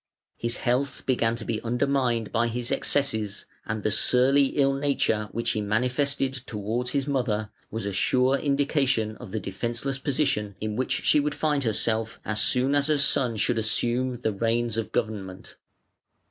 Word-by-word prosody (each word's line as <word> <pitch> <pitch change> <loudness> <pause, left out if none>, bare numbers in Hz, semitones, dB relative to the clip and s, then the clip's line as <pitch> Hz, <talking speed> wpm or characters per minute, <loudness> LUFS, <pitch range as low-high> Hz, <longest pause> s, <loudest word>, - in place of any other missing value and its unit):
His 115 +1 -1
health 135 +2 -1
began 115 -3 +1
to 115 -2 -6
be 110 -2 -2
undermined 120 -2 0
by 115 0 +1
his 120 +1 -3
excesses, 110 -8 0 0.2
and 110 -1 -3
the 110 - +1
surly 135 +5 +4
ill 135 -1 +3
nature 135 -6 0
which 115 +1 0
he 110 - -1
manifested 125 +6 0
towards 115 +4 -2
his 140 -2 0
mother 115 -7 -1 0.2
was 115 -2 -4
a 100 - -3
sure 130 +7 +2
indication 140 -6 +1
of - - -10
the 110 - -2
defenceless 120 +7 -3
position 125 -8 0
in 105 -1 -3
which 130 +3 -1
she 150 - +4
would 145 0 -1
find 150 -3 0
herself 110 0 -1
as 110 0 0
soon 130 +4 +3
as 145 0 +2
her 155 -1 +2
son 135 -4 +2
should 115 +3 +1
assume 120 +3 0
the 110 -3 0
reins 115 +2 0
of 115 -1 -3
government. 100 -5 -4
120 Hz, 165 wpm, -26 LUFS, 110-135 Hz, 0.2 s, surly